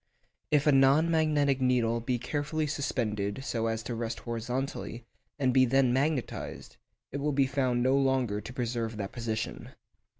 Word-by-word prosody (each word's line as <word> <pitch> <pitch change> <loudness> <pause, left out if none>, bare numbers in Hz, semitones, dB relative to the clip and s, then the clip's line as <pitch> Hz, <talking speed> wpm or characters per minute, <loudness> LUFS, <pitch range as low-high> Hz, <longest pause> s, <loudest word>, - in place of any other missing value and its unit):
If 150 -2 +3
a 150 - +6
non 140 +4 +5
magnetic 150 -4 +2
needle 120 -2 +2
be 125 +1 -1
carefully 150 +5 -2
suspended 120 -6 -2
so 115 -4 -1
as 115 0 -2
to 120 - -4
rest 115 0 -4
horizontally, 120 +1 -4 0.3
and 130 -3 +1
be 130 0 +6
then 130 0 +3
magnetised, 135 0 -2 0.3
it 140 - -3
will 145 +1 0
be 135 0 +3
found 130 -3 0
no 130 +1 +3
longer 130 -6 +1
to - - -8
preserve 115 -3 -3
that 100 -2 -4
position. 115 -2 -4
130 Hz, 160 wpm, -29 LUFS, 115-140 Hz, 0.3 s, a